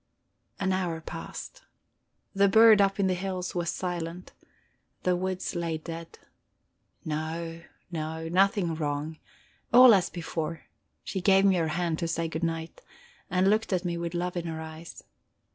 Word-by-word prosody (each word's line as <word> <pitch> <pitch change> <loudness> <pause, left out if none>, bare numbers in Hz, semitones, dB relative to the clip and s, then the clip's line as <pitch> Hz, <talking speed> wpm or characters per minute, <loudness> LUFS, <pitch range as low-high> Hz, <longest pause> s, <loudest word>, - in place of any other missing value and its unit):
An 190 -1 +1
hour 175 -3 -1
passed. - - -8 0.7
The 200 0 +4
bird 220 0 +7
up 195 0 +2
in 195 - +3
the 185 - +2
hills 185 0 -3
was 175 -1 -1
silent, 175 0 -4 0.7
the 180 -1 +2
woods 185 +1 -2
lay 170 -2 -2
dead. 165 +1 -8 0.9
No, 165 +2 -4 0.3
no, 160 0 -4
nothing 185 0 +2
wrong; 150 0 -3 0.5
all 245 0 +9
as 185 -4 +3
before; 165 -1 -4 0.4
she 190 - -4
gave 195 +1 +5
me 190 -2 +4
her 165 -2 +1
hand 165 0 -1
to 170 - -1
say 165 0 -1
good 160 +1 -4
night, 165 -1 -3 0.5
and 185 +2 +2
looked 215 +2 +2
at 185 -1 0
me 175 -1 -1
with 170 0 -4
love 180 +1 -2
in 170 -1 -3
her 160 -1 -4
eyes. 160 +1 -9
175 Hz, 155 wpm, -28 LUFS, 165-190 Hz, 0.9 s, all